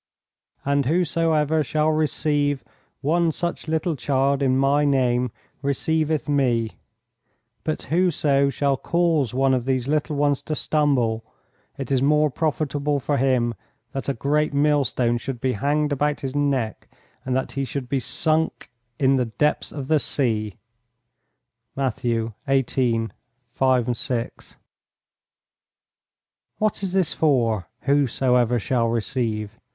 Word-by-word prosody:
"And 140 -1 +1
whosoever 160 -2 +2
shall 155 +3 +1
receive 145 -2 0 0.4
one 165 +3 +2
such 170 +1 -3
little 160 +1 0
child 140 +1 +1
in 130 -1 +2
My 140 +2 +3
name 125 -3 +2 0.3
receiveth 155 +2 0
Me, 125 -6 +1 0.9
but 155 - -2
whoso 150 -5 +2
shall 140 0 0
cause 165 -6 +1
one 135 0 +3
of 125 -2 0
these 130 -1 0
little 150 +1 0
ones 145 -1 +1
to 155 - -3
stumble, 130 -8 +1 0.5
it 135 -1 -5
is 130 -2 +2
more 150 +1 +3
profitable 145 -1 -1
for 140 +2 -1
him 125 -2 +2 0.4
that 135 +1 -4
a 140 - 0
great 145 +4 0
millstone 140 -5 +2
should 125 0 -5
be 130 +1 0
hanged 145 +6 0
about 145 +1 0
his 135 -1 -4
neck 135 -6 -1 0.4
and 130 -1 -1
that 130 - -1
he 135 - -2
should 135 -1 -4
be 135 +1 0
sunk 155 +4 -1 0.3
in 135 0 +3
the 125 - +1
depths 120 +7 0
of 140 -3 -6
the 155 0 +3
sea." 110 -8 -1 1.2
(Matt. 135 -2 -1
xviii. 115 0 0 0.4
5, 125 -1 +2
6.) 120 -1 -4 2.0
"What 215 -2 0
is 190 -2 -3
this 185 -4 +2
for, 115 - +1
'Whosoever 125 -3 +2
shall 115 +1 0
receive? 115 -2 -2
140 Hz, 125 wpm, -23 LUFS, 125-150 Hz, 2.0 s, My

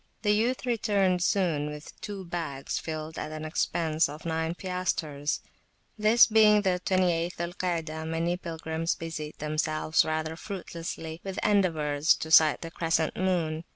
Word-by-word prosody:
The 210 -1 +4
youth 240 +5 0
returned 205 -6 +1
soon 170 -6 +1
with 150 0 -10
two 200 -3 -6
bags 165 -6 -3
filled 155 0 -5
at 155 - -4
an 155 0 -6
expense 160 0 +1
of 150 +3 -9
nine 160 0 -1
piastres. 170 -6 -2 0.5
This 215 +2 +6
being 215 -2 +5
the 180 -2 +1
28th 175 -2 +1
Zul 170 +1 -4
Kaadah, 160 -4 -2
many 165 +2 0
pilgrims 165 -1 -3
busied 155 -2 -6
themselves 155 +1 +1
[p.71] - - -1
rather 160 0 -2
fruitlessly 165 -3 -6
with 195 -1 -5
endeavours 160 -7 +3
to 160 - -6
sight 155 -2 +6
the 165 - -6
crescent 165 -2 0
moon. 170 -4 0
165 Hz, 150 wpm, -28 LUFS, 155-185 Hz, 0.5 s, This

